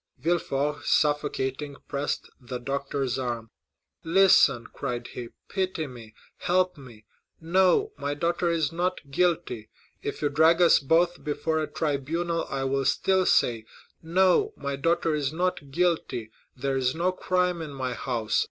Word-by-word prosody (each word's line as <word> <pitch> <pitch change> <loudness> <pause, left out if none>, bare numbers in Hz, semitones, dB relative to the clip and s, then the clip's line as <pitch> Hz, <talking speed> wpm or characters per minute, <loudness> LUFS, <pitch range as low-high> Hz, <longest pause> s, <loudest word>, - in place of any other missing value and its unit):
Villefort, 150 -1 -1
suffocating, 145 -1 0
pressed 140 +1 -2
the 125 -1 -6
doctor's 135 0 -2
arm. 120 -3 -4 0.5
40124m 165 - -6
"Listen," 140 -11 +5
cried 120 -3 -4
he; 120 -1 -7 0.2
"pity 185 -4 -2
me—help 135 +9 -2
me! 120 -6 -14 0.3
No, 190 - +3
my 145 0 -2
daughter 170 +2 0
is 160 -3 +1
not 175 -4 -2
guilty. 145 -9 0 0.3
If - - -5
you 145 - +3
drag 160 +4 +4
us 175 -2 +6
both 170 +5 +2
before 160 +1 -1
a 155 - -2
tribunal 160 +3 -2
I 135 -1 -2
will 135 0 0
still 190 +5 +2
say, 115 -2 +2 0.4
'No, 190 - +3
my 140 0 -3
daughter 165 +3 +1
is 145 -3 0
not 170 -4 -2
guilty;—there 135 -5 -2
is 130 +1 0
no 175 +3 +1
crime 180 -1 0
in 160 - -5
my 130 -2 -3
house. 115 -5 -1
150 Hz, 140 wpm, -26 LUFS, 135-175 Hz, 0.5 s, us